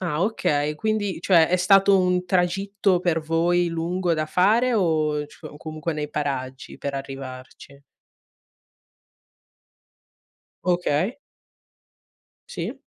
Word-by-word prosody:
Ah 170 Hz, -4 st, -2 dB
okay, 150 Hz, -8 st, 0 dB
quindi 205 Hz, -2 st, -2 dB
cioè, 170 Hz, -4 st, +5 dB
è 180 Hz, -, +2 dB
stato 195 Hz, +2 st, +5 dB
un 180 Hz, 0 st, +1 dB
tragitto 190 Hz, +1 st, +1 dB
per 175 Hz, -2 st, +1 dB
voi 170 Hz, +2 st, +1 dB
lungo 170 Hz, +2 st, -1 dB
da 155 Hz, 0 st, -2 dB
fare 220 Hz, +9 st, +3 dB
o 155 Hz, -6 st, +1 dB
c -, -, -18 dB
o 145 Hz, -, -9 dB
comunque 155 Hz, +1 st, -5 dB
nei 150 Hz, -1 st, -4 dB
paraggi 135 Hz, -3 st, -4 dB
per 140 Hz, -, -4 dB
arrivarci? 135 Hz, 0 st, -9 dB, 2.8 s
Okay. 180 Hz, -, 0 dB, 1.3 s
Sì. -, -, -5 dB
170 Hz, 105 wpm, -23 LUFS, 150-185 Hz, 2.8 s, cioè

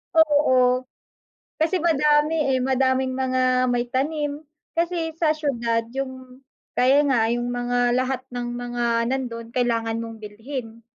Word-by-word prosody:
Oo. 260 Hz, -5 st, +4 dB, 0.8 s
Kasi 325 Hz, +3 st, +1 dB
madami 300 Hz, -2 st, +2 dB
eh, 260 Hz, -, +1 dB
madaming 260 Hz, 0 st, +1 dB
mga 260 Hz, -1 st, 0 dB, 0.2 s
may 245 Hz, -1 st, +1 dB
tanim, 295 Hz, +2 st, -2 dB, 0.3 s
kasi 335 Hz, -1 st, 0 dB
sa 320 Hz, -2 st, +2 dB
siyudad 235 Hz, -7 st, -1 dB
yung, 260 Hz, -1 st, -6 dB, 0.4 s
kaya 265 Hz, +3 st, +5 dB
nga 230 Hz, -4 st, +3 dB
yung 240 Hz, 0 st, -1 dB
mga 245 Hz, 0 st, +1 dB
lahat 255 Hz, 0 st, 0 dB
ng 245 Hz, -1 st, -4 dB
mga 245 Hz, 0 st, -3 dB, 0.3 s
nandun 240 Hz, -3 st, -3 dB
kailangan 230 Hz, -2 st, 0 dB
mong 230 Hz, 0 st, -6 dB
bilhin. 225 Hz, +2 st, -7 dB
255 Hz, 125 wpm, -23 LUFS, 240-290 Hz, 0.8 s, kaya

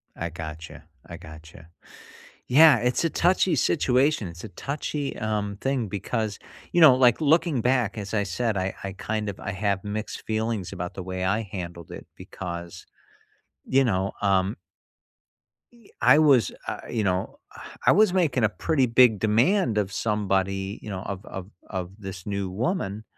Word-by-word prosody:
I 85 Hz, -, -4 dB
gotcha, 80 Hz, -1 st, -8 dB, 0.2 s
I -, -, -9 dB
gotcha. 80 Hz, +1 st, -13 dB, 0.8 s
Yeah, 150 Hz, +1 st, +7 dB
it's 125 Hz, +5 st, 0 dB
a 165 Hz, -, +1 dB
touchy 180 Hz, +2 st, +2 dB
situation, 135 Hz, -, +2 dB
it's 85 Hz, +3 st, -10 dB
a -, -, -6 dB
touchy, 140 Hz, +5 st, -4 dB
um, 105 Hz, -2 st, -2 dB
thing 135 Hz, -5 st, -1 dB
because, 105 Hz, +1 st, -3 dB, 0.3 s
you 175 Hz, -, +3 dB
know, 155 Hz, -6 st, +9 dB
like, 125 Hz, -1 st, +4 dB
looking 160 Hz, -2 st, +2 dB
back, 120 Hz, -3 st, +1 dB
as 100 Hz, 0 st, -5 dB
I 105 Hz, -1 st, +1 dB
said, 110 Hz, +3 st, -1 dB
I 95 Hz, 0 st, -2 dB
I 95 Hz, -, -4 dB
kind 105 Hz, +2 st, -3 dB
of 100 Hz, -, -5 dB
I 100 Hz, -, -4 dB
have 100 Hz, 0 st, -1 dB
mixed 105 Hz, +1 st, -5 dB
feelings 110 Hz, -4 st, -2 dB
about 90 Hz, -2 st, -5 dB
the 95 Hz, -, -6 dB
way 95 Hz, 0 st, -4 dB
I 100 Hz, +4 st, +1 dB
handled 85 Hz, -4 st, -7 dB
it -, -, -9 dB
because, 85 Hz, -1 st, -8 dB, 0.8 s
you 135 Hz, +1 st, +3 dB
know, 95 Hz, -5 st, 0 dB
um 100 Hz, +1 st, +2 dB, 1.2 s
e 235 Hz, -4 st, -21 dB
I 125 Hz, +4 st, +6 dB
was, 135 Hz, -, +4 dB, 0.2 s
uh, -, -, -3 dB
you 110 Hz, -3 st, -1 dB
know, 95 Hz, -1 st, -2 dB, 0.5 s
I -, -, +7 dB
was 210 Hz, -1 st, +4 dB
making 155 Hz, -10 st, +1 dB
a 105 Hz, -, +4 dB
pretty 140 Hz, +4 st, +1 dB
big 120 Hz, -3 st, +5 dB
demand 115 Hz, -, +2 dB
of 100 Hz, -2 st, 0 dB
somebody, 95 Hz, -2 st, -1 dB
you -, -, -9 dB
know, 95 Hz, -2 st, -4 dB
of 100 Hz, +1 st, -6 dB
of 95 Hz, 0 st, -8 dB, 0.2 s
of 90 Hz, -3 st, -4 dB
this 95 Hz, -3 st, -8 dB
new 100 Hz, -2 st, -3 dB
woman 105 Hz, -, -2 dB
105 Hz, 165 wpm, -25 LUFS, 95-125 Hz, 1.2 s, know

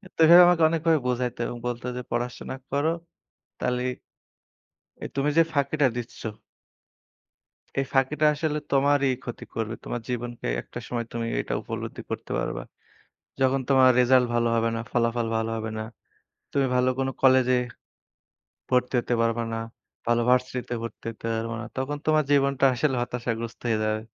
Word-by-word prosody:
তো -, -, -26 dB
এভাবে 175 Hz, +2 st, +10 dB
আমাকে 175 Hz, -2 st, +4 dB
অনেকভাবে 165 Hz, -1 st, +2 dB
বোঝাইত 125 Hz, -1 st, -1 dB
এবং 120 Hz, -, -5 dB
বলত 120 Hz, -1 st, -3 dB
যে, -, -, -3 dB
"পড়াশোনা 120 Hz, +2 st, -3 dB
করো, 145 Hz, +3 st, +1 dB, 0.7 s
তাহলে 125 Hz, 0 st, -1 dB, 1.2 s
এ -, -, -3 dB
তুমি 140 Hz, +1 st, +1 dB
যে 165 Hz, -, +8 dB
ফাঁকিটা 140 Hz, 0 st, +2 dB
দিচ্ছ" 120 Hz, -1 st, -7 dB, 1.6 s
"এই 135 Hz, -, +2 dB
ফাঁকিটা 135 Hz, +3 st, +2 dB
আসলে 150 Hz, 0 st, -1 dB
তোমারই 140 Hz, 0 st, +3 dB
ক্ষতি 120 Hz, -, -7 dB
করবে। 115 Hz, 0 st, -2 dB
তোমার 120 Hz, -, -4 dB
জীবনকে 120 Hz, -, -4 dB
একটা -, -, -9 dB
সময় 120 Hz, -2 st, -2 dB
তুমি 115 Hz, -1 st, -2 dB
এটা -, -, -4 dB
উপলব্ধি -, -, -6 dB
করতে -, -, -5 dB
পারবা। -, -, -3 dB, 0.8 s
যখন 130 Hz, +1 st, +3 dB
তোমার 130 Hz, -1 st, +6 dB
রেজাল্ট 125 Hz, 0 st, +5 dB
ভালো 120 Hz, 0 st, +2 dB
হবে 115 Hz, 0 st, +2 dB
না, 115 Hz, -, -2 dB
ফলাফল 115 Hz, -1 st, +1 dB
ভালো 115 Hz, 0 st, -1 dB
হবে 110 Hz, 0 st, -4 dB
না। -, -, -2 dB, 0.7 s
তুমি 140 Hz, -1 st, +2 dB
ভালো 125 Hz, 0 st, +3 dB
কোন 135 Hz, 0 st, 0 dB
কলেজে 130 Hz, -1 st, +5 dB, 1.1 s
ভর্তি 125 Hz, 0 st, +1 dB
হতে 120 Hz, -, -1 dB
পারবা 115 Hz, 0 st, +1 dB
না। 115 Hz, -, -2 dB, 0.5 s
ভালো 120 Hz, 0 st, +3 dB
ভার্সিটিতে 125 Hz, -1 st, 0 dB
ভর্তি 115 Hz, 0 st, -8 dB
হতে 115 Hz, -, -9 dB
পারবা 115 Hz, +1 st, -3 dB
না। -, -, -5 dB
তখন 140 Hz, +3 st, -2 dB
তোমার 155 Hz, -1 st, +4 dB
জীবনটা 140 Hz, -1 st, +3 dB
আসলে 135 Hz, +1 st, +1 dB
হতাশাগ্রস্ত 115 Hz, -1 st, -4 dB
হয়ে 110 Hz, -1 st, +2 dB
যাবে।" 110 Hz, 0 st, 0 dB
125 Hz, 155 wpm, -26 LUFS, 120-140 Hz, 1.6 s, এভাবে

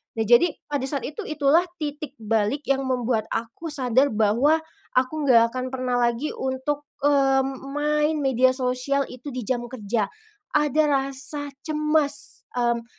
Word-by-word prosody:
Nah, 225 Hz, -, 0 dB
jadi 240 Hz, +10 st, +5 dB, 0.2 s
pada 280 Hz, -3 st, -1 dB
saat 280 Hz, -1 st, -2 dB
itu, 300 Hz, -, -7 dB
itulah 305 Hz, +3 st, +3 dB, 0.2 s
titik 295 Hz, -1 st, -4 dB
balik 220 Hz, +6 st, 0 dB
yang 270 Hz, 0 st, +2 dB
membuat 245 Hz, -4 st, 0 dB
aku 235 Hz, +8 st, -4 dB
sadar, 260 Hz, 0 st, +2 dB
bahwa 235 Hz, +9 st, +3 dB, 0.3 s
aku 275 Hz, +4 st, +1 dB
enggak 230 Hz, -3 st, +6 dB
akan 255 Hz, 0 st, -4 dB
pernah 255 Hz, -1 st, -1 dB
lagi 240 Hz, +4 st, +1 dB
untuk, 265 Hz, +3 st, -2 dB, 0.2 s
mmm, 270 Hz, -2 st, +2 dB
main 300 Hz, +1 st, +1 dB
media 260 Hz, -1 st, +3 dB
sosial 255 Hz, +2 st, -1 dB
itu 255 Hz, +2 st, -8 dB
di 255 Hz, -, -3 dB
jam 240 Hz, +2 st, -2 dB
kerja. 225 Hz, -3 st, -2 dB, 0.5 s
Ada 300 Hz, 0 st, +3 dB
rasa 275 Hz, +1 st, -2 dB, 0.2 s
cemas, 305 Hz, -1 st, 0 dB
mmm, 235 Hz, -1 st, 0 dB
265 Hz, 145 wpm, -24 LUFS, 245-295 Hz, 0.5 s, enggak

